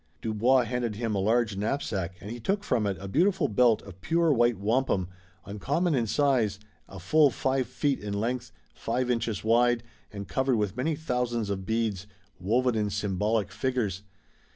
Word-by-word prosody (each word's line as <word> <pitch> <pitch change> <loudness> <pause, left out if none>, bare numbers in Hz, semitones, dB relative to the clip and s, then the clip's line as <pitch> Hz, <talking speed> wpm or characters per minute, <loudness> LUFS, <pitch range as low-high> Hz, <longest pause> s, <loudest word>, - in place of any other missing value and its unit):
Dubois 115 +5 +2
handed 120 -2 -2
him 115 0 -2
a 100 - 0
large 110 +1 +1
knapsack 100 -4 -2
and 105 - -8
he 120 - -6
took 195 - -1
from 115 - 0
it 95 -2 -2
a 100 - -7
beautiful 175 - +2
belt 115 0 +3
of 95 -2 -13
pure 165 - +2
white 120 -2 +3
wampum, 105 -2 0 0.4
uncommon 140 - -1
in 120 -5 +1
size, 120 -6 +1 0.3
a 95 - -9
full 145 - +4
five 130 +1 -1
feet 145 -2 -1
in 100 -1 -4
length, 120 +3 -2 0.2
five 125 +2 -1
inches 115 -4 -2
wide, 120 +1 +3 0.3
and 100 -1 -7
covered 130 -1 +1
with 105 -4 -1
many 155 +5 0
thousands 125 -7 -2
of 95 -1 -4
beads, 110 -4 -1 0.3
woven 120 +7 +1
in 105 -2 0
symbolic 105 +1 -1
figures. 115 -8 -2
115 Hz, 170 wpm, -27 LUFS, 105-130 Hz, 0.4 s, full